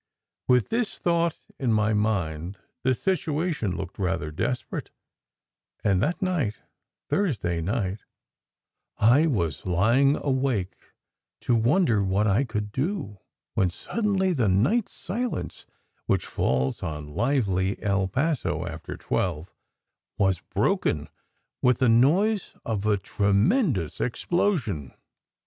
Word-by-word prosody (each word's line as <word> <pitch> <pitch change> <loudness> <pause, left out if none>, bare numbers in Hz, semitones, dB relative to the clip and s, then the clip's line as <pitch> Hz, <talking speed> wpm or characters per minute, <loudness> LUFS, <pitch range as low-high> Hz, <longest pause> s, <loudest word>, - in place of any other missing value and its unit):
With 125 -3 +3
this 230 -1 -1
thought 170 -1 +1 0.2
in 125 -4 +1
my 110 0 +2
mind, 95 -4 -1 0.2
the 130 0 +2
situation 155 - -1
looked 95 0 -7
rather 90 -5 -1
desperate, 125 +10 -3 0.9
and 95 -3 +2
that 175 +5 0
night 160 - 0 0.5
Thursday 105 - 0
night 100 +1 -1 1.0
I 130 +9 +5
was 85 - -1
lying 115 +11 +4
awake 130 -11 -1 0.6
to 120 - +1
wonder 115 - +3
what 95 +2 +1
I 110 +6 +3
could 105 -3 -3
do, 135 - -3 0.3
when 95 - +2
suddenly 190 - 0
the 125 -9 +1
night 125 - +2
silence 205 - -4 0.4
which - - +1
falls 65 0 0
on 75 -2 -5
lively 100 - +1
El 100 -2 +1
Paso 115 - -1
after 80 -2 -7
twelve 85 -3 -2 0.6
was 95 -3 +2
broken - - 0 0.5
with 125 -2 +4
the 130 -2 +3
noise 175 - +3
of 105 -2 -1
a 105 -1 +3
tremendous 100 - +1
ex 120 - -2
plosion. 140 - 0
110 Hz, 115 wpm, -26 LUFS, 95-150 Hz, 1.0 s, I